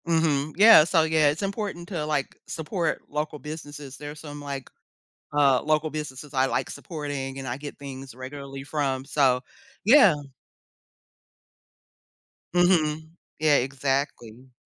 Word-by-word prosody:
Mhm, 155 Hz, -3 st, +1 dB
yeah, 215 Hz, -5 st, +9 dB
so 165 Hz, 0 st, +3 dB
yeah, 155 Hz, -2 st, +3 dB
it's 150 Hz, +6 st, -2 dB
important 195 Hz, -3 st, -4 dB
to, 170 Hz, -6 st, -3 dB
like, 150 Hz, -3 st, -2 dB
support 165 Hz, +1 st, -2 dB
local 150 Hz, +1 st, -3 dB
businesses. 145 Hz, -2 st, -8 dB
There's 150 Hz, +1 st, -8 dB
some, 145 Hz, -1 st, -8 dB
like, 140 Hz, -2 st, -6 dB, 0.6 s
uh, 140 Hz, -3 st, +4 dB
local 155 Hz, +1 st, +1 dB
businesses 150 Hz, -1 st, -6 dB
I 130 Hz, -1 st, +3 dB
like -, -, -1 dB
supporting 145 Hz, -5 st, -5 dB
and 135 Hz, -, -6 dB
I 120 Hz, +1 st, -3 dB
get 145 Hz, 0 st, -8 dB
things 135 Hz, -2 st, -8 dB
regularly 135 Hz, +2 st, -8 dB
from, 135 Hz, -2 st, -2 dB
so 130 Hz, -3 st, +2 dB, 0.4 s
yeah. 220 Hz, -, +8 dB, 2.4 s
Mhm. 160 Hz, -3 st, +2 dB, 0.3 s
Yeah, 155 Hz, -1 st, +4 dB
exactly. 130 Hz, -2 st, -3 dB
145 Hz, 125 wpm, -26 LUFS, 135-160 Hz, 2.4 s, yeah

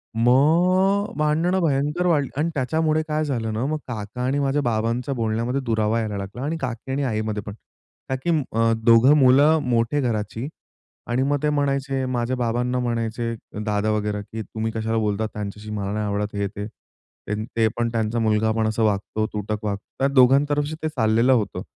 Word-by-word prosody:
मग 175 Hz, -, +3 dB
भांडणं 160 Hz, +5 st, +1 dB
भयंकर 150 Hz, +3 st, 0 dB
वाढली. 145 Hz, -6 st, +2 dB
आणि 155 Hz, +3 st, +1 dB
त्याच्यामुळे 155 Hz, +3 st, +1 dB
काय 155 Hz, 0 st, 0 dB
झालं 115 Hz, -6 st, -2 dB
ना 115 Hz, +4 st, -1 dB
मग 155 Hz, +2 st, -1 dB
काका 110 Hz, 0 st, -6 dB
आणि 135 Hz, +3 st, +1 dB
माझ्या 140 Hz, +1 st, +1 dB
बाबांच्या 120 Hz, +2 st, -1 dB
बोलण्यामध्ये 115 Hz, +3 st, -1 dB
दुरावा 110 Hz, -1 st, +1 dB
यायला 105 Hz, -2 st, -3 dB
लागला 100 Hz, +6 st, -6 dB
आणि 155 Hz, +4 st, -2 dB
काकी 125 Hz, 0 st, -4 dB
आणि 140 Hz, +2 st, -1 dB
आईमध्ये 110 Hz, -4 st, -2 dB
पण. 105 Hz, -, -6 dB, 0.6 s
काकी 130 Hz, +5 st, -2 dB, 0.2 s
अ, 115 Hz, +1 st, +2 dB
दोघं 115 Hz, +4 st, +6 dB
मुलं 145 Hz, +4 st, +5 dB
मोठे 120 Hz, +2 st, +1 dB
घराची 110 Hz, 0 st, -2 dB, 0.6 s
आणि 125 Hz, +2 st, +1 dB
मग 145 Hz, +1 st, +1 dB
ते 150 Hz, -, +3 dB
म्हणायचे 140 Hz, -2 st, 0 dB
माझ्या 125 Hz, 0 st, -1 dB
बाबांना 125 Hz, +1 st, 0 dB
म्हणायचे 115 Hz, -1 st, -2 dB, 0.3 s
दादा 105 Hz, 0 st, 0 dB
वगैरा, 105 Hz, -1 st, -1 dB
की 110 Hz, +2 st, -7 dB
तुम्ही 110 Hz, +2 st, -4 dB
कशाला 110 Hz, 0 st, -2 dB
बोलतात 110 Hz, 0 st, 0 dB
त्यांच्याशी 105 Hz, +1 st, -6 dB
मला 100 Hz, -2 st, -3 dB
नाही 105 Hz, 0 st, -1 dB
आवडत. 105 Hz, 0 st, -2 dB
हे 100 Hz, 0 st, 0 dB
ते, 100 Hz, +1 st, -6 dB, 0.8 s
ते 115 Hz, -1 st, +1 dB
पण 120 Hz, 0 st, +1 dB
त्यांचा 115 Hz, 0 st, -1 dB
मुलगा 110 Hz, 0 st, +2 dB
पण 110 Hz, 0 st, 0 dB
असं 110 Hz, +1 st, 0 dB
वागतो 110 Hz, +1 st, 0 dB
तुटक 105 Hz, 0 st, -3 dB
वागतो. 100 Hz, -1 st, -2 dB, 0.2 s
त्या 135 Hz, -, +3 dB
दोघांतर्फे 145 Hz, +4 st, +4 dB
ते 155 Hz, -, 0 dB
चाललेलं 115 Hz, -2 st, +3 dB
होतं. 110 Hz, -5 st, -1 dB
120 Hz, 170 wpm, -23 LUFS, 110-140 Hz, 0.8 s, दोघं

